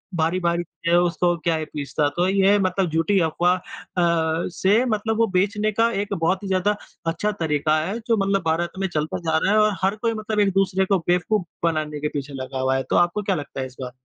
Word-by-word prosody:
भारी-भारी 170 Hz, +1 st, 0 dB
चीज़ें 170 Hz, 0 st, -3 dB
है 175 Hz, -, +6 dB
उसको 175 Hz, 0 st, +1 dB
क्या 165 Hz, +1 st, 0 dB
ही 155 Hz, -, -3 dB
पिसता। 150 Hz, 0 st, -2 dB
तो 175 Hz, +1 st, +2 dB
ये 195 Hz, 0 st, +4 dB
है 205 Hz, -, +5 dB
मतलब 185 Hz, -1 st, 0 dB
झूठी 165 Hz, +5 st, +2 dB
अफ़वा 170 Hz, +2 st, +2 dB
अ, 185 Hz, -, -7 dB, 0.9 s
से 200 Hz, +7 st, +2 dB
मतलब 220 Hz, -1 st, -1 dB
वो 230 Hz, 0 st, +3 dB
बेचने 210 Hz, +3 st, +1 dB
का 230 Hz, +2 st, +2 dB
एक 205 Hz, 0 st, -4 dB
बहुत 185 Hz, +2 st, 0 dB
ही -, -, -4 dB
ज़्यादा 190 Hz, +2 st, +1 dB, 0.3 s
अच्छा 170 Hz, +6 st, 0 dB
तरीक़ा 155 Hz, 0 st, +1 dB
है 200 Hz, +6 st, -3 dB
जो 230 Hz, -2 st, +3 dB
मतलब 195 Hz, 0 st, +1 dB
भारत 165 Hz, +2 st, 0 dB
में 195 Hz, -, 0 dB
चलता 155 Hz, 0 st, -1 dB
जा 160 Hz, -2 st, 0 dB
रहा 195 Hz, -, +2 dB
है -, -, +4 dB
और 215 Hz, -1 st, +3 dB
हर 195 Hz, +2 st, +2 dB
कोई 230 Hz, +1 st, -1 dB
मतलब 215 Hz, -1 st, -3 dB
एक-दूसरे 195 Hz, -1 st, +2 dB
को 190 Hz, -1 st, +2 dB
बेवकूफ़ 180 Hz, +2 st, +1 dB, 0.2 s
बनाने 155 Hz, -2 st, -1 dB
के 150 Hz, -, -1 dB
पीछे 140 Hz, 0 st, -6 dB
लगा 130 Hz, 0 st, -5 dB
हुआ 130 Hz, 0 st, +1 dB
है। 135 Hz, -, -2 dB
तो -, -, +1 dB
आपको 175 Hz, +4 st, +2 dB
क्या 195 Hz, -1 st, 0 dB
लगता 145 Hz, -3 st, -6 dB
है -, -, -2 dB
इस 130 Hz, -, -17 dB
बार? 125 Hz, -1 st, -5 dB
180 Hz, 230 wpm, -23 LUFS, 160-200 Hz, 0.9 s, है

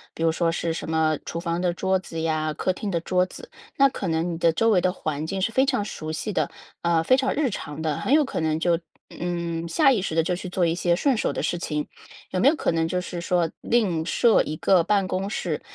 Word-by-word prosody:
比 165 Hz, -, -3 dB
如 165 Hz, -, +4 dB
说 165 Hz, 0 st, +1 dB
是 165 Hz, 0 st, -2 dB
什 160 Hz, -, -5 dB
么 160 Hz, -1 st, +2 dB
厨 170 Hz, -, -4 dB
房 170 Hz, 0 st, -2 dB
的 180 Hz, -1 st, +1 dB
桌 190 Hz, +1 st, +1 dB
子 165 Hz, -3 st, -7 dB
呀， 155 Hz, -1 st, 0 dB
客 185 Hz, -, -1 dB
厅 205 Hz, +2 st, -4 dB
的 170 Hz, -, 0 dB
桌 180 Hz, +1 st, +2 dB
子， 480 Hz, -, -12 dB, 0.3 s
那 275 Hz, -, +6 dB
可 210 Hz, -7 st, -5 dB
能 165 Hz, +1 st, 0 dB
你 -, -, -4 dB
的 170 Hz, -1 st, +4 dB
周 225 Hz, +7 st, +2 dB
围 185 Hz, -4 st, +4 dB
的 185 Hz, -, +2 dB
环 155 Hz, -3 st, -3 dB
境 195 Hz, +3 st, -3 dB
是 215 Hz, -, +1 dB
非 260 Hz, +3 st, +3 dB
常 260 Hz, -7 st, 0 dB
熟 155 Hz, -6 st, -6 dB
悉 200 Hz, +7 st, -3 dB
的， -, -, 0 dB, 0.3 s
呃， 170 Hz, -1 st, +2 dB
非 255 Hz, +10 st, +4 dB
常 265 Hz, 0 st, +1 dB
日 290 Hz, -3 st, +1 dB
常 150 Hz, -4 st, -6 dB
的， 155 Hz, -2 st, -1 dB
很 265 Hz, -, 0 dB
有 300 Hz, 0 st, +5 dB
可 -, -, -4 dB
能 160 Hz, -1 st, 0 dB
就， 170 Hz, 0 st, +2 dB, 0.3 s
嗯， 170 Hz, -1 st, -3 dB
下 275 Hz, -, +4 dB
意 230 Hz, -7 st, +1 dB
识 170 Hz, -4 st, -3 dB
地 165 Hz, -, +3 dB
就 180 Hz, +2 st, 0 dB
去 185 Hz, +1 st, -6 dB
做 180 Hz, 0 st, +1 dB
一 165 Hz, -, +1 dB
些 175 Hz, 0 st, +2 dB
顺 270 Hz, +8 st, +2 dB
手 -, -, 0 dB
的 -, -, -3 dB
事 175 Hz, -, 0 dB
情。 150 Hz, -3 st, -3 dB, 0.4 s
有 185 Hz, -, -1 dB
没 240 Hz, -, +4 dB
有 300 Hz, -, +5 dB
可 -, -, 0 dB
能 165 Hz, -1 st, +1 dB
就 180 Hz, +2 st, -1 dB
是 180 Hz, -1 st, -6 dB
说， 175 Hz, -1 st, +1 dB
另 195 Hz, -9 st, +1 dB
设 230 Hz, +5 st, +4 dB
一 155 Hz, -, -4 dB
个 180 Hz, 0 st, +4 dB
办 200 Hz, +1 st, +1 dB
公 190 Hz, +1 st, -2 dB
室？ -, -, -3 dB
175 Hz, 280 characters per minute, -24 LUFS, 165-195 Hz, 0.4 s, 那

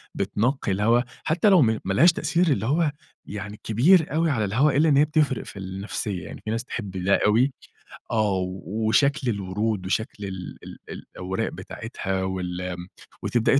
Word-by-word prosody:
بتنقّي 120 Hz, -1 st, 0 dB
الهوا 115 Hz, +5 st, +3 dB, 0.2 s
حتّى 175 Hz, +7 st, +3 dB
لو 185 Hz, -5 st, +6 dB
م 110 Hz, -3 st, +2 dB
ما 95 Hz, -, 0 dB
لهاش 165 Hz, -, +6 dB
تأثير 175 Hz, +1 st, +1 dB
اللي 110 Hz, -8 st, +1 dB
هو 150 Hz, +3 st, +2 dB, 0.3 s
يعني 105 Hz, +1 st, -7 dB
كبير 155 Hz, -, +5 dB
أوي 165 Hz, +1 st, +2 dB
على 110 Hz, -5 st, 0 dB
الهوا 130 Hz, +9 st, +3 dB
إلّا 160 Hz, +1 st, +4 dB
إن 140 Hz, -, +4 dB
هي 150 Hz, -, +6 dB
بتفرق 150 Hz, -4 st, +1 dB
في 100 Hz, -, -9 dB
النفسية، 95 Hz, 0 st, -4 dB
يعني -, -, -9 dB
في -, -, -3 dB
ناس 115 Hz, +2 st, -1 dB
تحب 105 Hz, -6 st, -5 dB
ده 100 Hz, -, +3 dB
أوي. 120 Hz, +6 st, +3 dB, 0.6 s
آه. 105 Hz, -4 st, +2 dB
و 95 Hz, +4 st, -3 dB
وشكل 140 Hz, +2 st, +2 dB
الورود 100 Hz, 0 st, -2 dB
وشكل 105 Hz, +1 st, -2 dB
ال 95 Hz, -2 st, -7 dB
ال -, -, -10 dB
الأوراق 95 Hz, +1 st, -4 dB
بتاعتها 95 Hz, -4 st, -4 dB
وال 90 Hz, -1 st, -3 dB
م 90 Hz, -, -8 dB, 0.4 s
وتبدأي 125 Hz, +3 st, +3 dB
110 Hz, 170 wpm, -25 LUFS, 95-140 Hz, 0.6 s, لو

